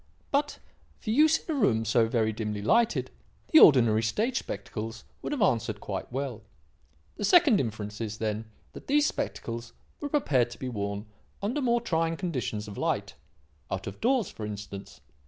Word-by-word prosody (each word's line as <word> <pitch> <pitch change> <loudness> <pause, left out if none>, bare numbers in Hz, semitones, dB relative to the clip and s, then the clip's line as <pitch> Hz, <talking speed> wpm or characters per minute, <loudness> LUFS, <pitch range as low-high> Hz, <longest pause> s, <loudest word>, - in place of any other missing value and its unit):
But, 285 +1 +1 0.4
for 215 - -4
use 310 +6 +5
in 320 - -4
a - - -1
room 115 - +2
so 115 +1 +3
very 110 -1 +1
dimly 105 -2 -3
lighted, 230 - +2 0.4
the 315 - +9
ordinary 115 -6 +7
stage 220 - 0
spectacles 110 +1 -6 0.2
would - - -4
have 280 -7 +1
answered 110 - +1
quite 100 +3 -5
well. 130 -3 -3 0.8
The - - -4
second 285 - +6
inference 105 -2 -4
is, 110 -1 -4
then, 110 0 -2 0.3
that - - -11
these 295 +2 +4
spectacles 115 - -4 0.3
were 290 - -4
prepared 135 - +2
to 120 - -10
be 130 - -4
worn 100 -2 -3 0.3
under 235 +9 -1
more 240 -2 +2
trying 165 -5 0
conditions 130 - -3
of 100 - -7
light - - -1 0.6
out 95 0 -3
of 100 - -7
doors, 245 -4 +2
for 110 - -8
instance. 100 -3 -7
120 Hz, 170 wpm, -28 LUFS, -, 0.8 s, the